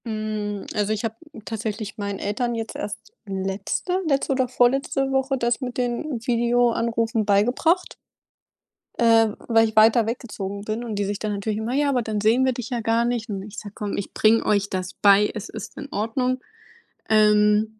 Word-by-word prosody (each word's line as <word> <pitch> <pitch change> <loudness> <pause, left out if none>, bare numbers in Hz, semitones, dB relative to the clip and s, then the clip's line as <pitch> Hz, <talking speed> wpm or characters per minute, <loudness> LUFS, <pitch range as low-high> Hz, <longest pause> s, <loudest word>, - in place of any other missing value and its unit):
Hm, 215 -2 -3
also, 210 0 0
ich 215 - -4
habe 225 -1 -2 0.3
tatsächlich 220 0 -4
meinen 200 -1 -3
Eltern 240 +4 -1
jetzt 225 -1 -5
erst 205 - -4 0.3
letzte 195 - -2
letzte 275 -2 +1
oder 260 -1 +1
vorletzte 270 +2 +1
Woche 265 0 +1
das 240 +1 0
mit 250 -1 -5
den 245 +2 -2
Videoanrufen 235 -2 +1
beigebracht 245 - +2 1.0
äh, 225 -1 +5 0.2
weil 225 -1 +4
ich 220 - -12
weiter 220 +1 +6
weggezogen 205 -4 -5
bin 215 +3 -3
und 225 -3 -4
die 200 0 -1
sich 200 0 -3
dann 215 -1 -2
natürlich 210 +1 -2
immer 225 +3 -3
„Ja, 285 +1 +2
aber 255 -3 +1
dann 220 -2 -2
sehen 225 +5 +3
wir 260 - +3
dich 245 -1 -6
ja 240 -2 -1
gar 230 +1 +2
nicht.“, 240 -1 -2
und 195 -2 -3
ich 210 +1 -11
so: 205 - -8
„Komm, 205 -1 -4
ich 200 - -5
bringe 220 +1 +3
euch 205 -1 +1
das 185 -1 -4
bei, 205 +1 +5
es 215 -1 -6
ist 220 -2 -8
in 285 - -6
Ordnung.“ 250 +4 -1 0.7
Ähm, 210 0 +4
225 Hz, 180 wpm, -23 LUFS, 210-245 Hz, 1.0 s, weiter